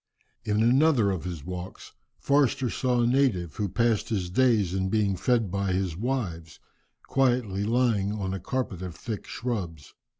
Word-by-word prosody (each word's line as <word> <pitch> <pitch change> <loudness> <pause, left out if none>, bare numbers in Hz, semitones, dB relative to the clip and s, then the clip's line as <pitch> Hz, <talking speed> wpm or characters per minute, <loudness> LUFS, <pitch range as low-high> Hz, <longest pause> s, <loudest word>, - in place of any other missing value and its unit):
In 105 +1 +1
another 125 -3 +4
of 90 -3 -4
his 85 -5 -6
walks 90 0 -7 0.3
Forster 140 -3 +2
saw 125 -2 +1
a - - +3
native, 120 - +1
who 105 -2 -1
passed 115 +1 +1
his 95 -5 -2
days 110 -5 +3
in 95 0 -1
being 105 -2 +1
fed 115 0 +1
by 100 -1 -1
his 90 -3 -1
wives, 90 -8 -3 0.5
quietly 120 -7 +1
lying 110 -3 +1
upon 95 -3 -3
a 95 - -3
carpet 100 -2 -3
of 90 -3 -6
thick 110 -4 -6
shrubs. 90 - -5
105 Hz, 160 wpm, -27 LUFS, 95-120 Hz, 0.5 s, another